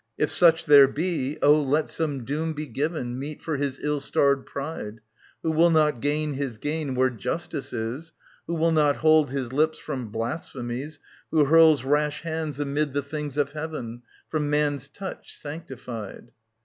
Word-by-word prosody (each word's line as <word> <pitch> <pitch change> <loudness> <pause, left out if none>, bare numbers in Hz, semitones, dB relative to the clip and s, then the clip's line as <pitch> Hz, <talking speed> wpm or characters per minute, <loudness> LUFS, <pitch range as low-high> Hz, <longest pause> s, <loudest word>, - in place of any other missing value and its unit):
If - - +1
such 165 -2 +4
there 145 -2 +8
be, 150 -2 -2
oh, 150 +1 +6
let 145 +2 +1
some 145 -6 -2
doom 155 +4 -2
be 150 0 -5
given 130 -2 -3
Meet 145 +2 -6
for 160 -3 -2
his 140 -1 -2
ill 150 0 0
starred 140 0 +1
pride. 140 -7 -6 0.4
Who 160 - +1
will 165 +2 +5
not 150 -6 +3
gain 150 +1 0
his 135 -4 -4
gain 145 +1 -2
where 130 0 +3
Justice 140 +5 -4
is. 120 +8 -4 0.4
Who 170 - -2
will 165 +1 +2
not 150 -3 +3
hold 155 -2 +4
his 130 -2 -3
lips 155 +3 +2
from 130 -6 -5
blasphemies, 120 +4 -5 0.3
Who 155 -2 +4
hurls 160 -2 +6
rash 150 +3 0
hands 160 -3 -3
amid 145 0 -1
the 145 0 -1
things 150 -1 -5
of 140 -1 +1
heaven 145 -6 -6 0.3
From 150 -2 -1
man's 145 -1 0
touch 190 +6 -8
sanctified. 130 - -8
145 Hz, 165 wpm, -25 LUFS, 135-155 Hz, 0.4 s, there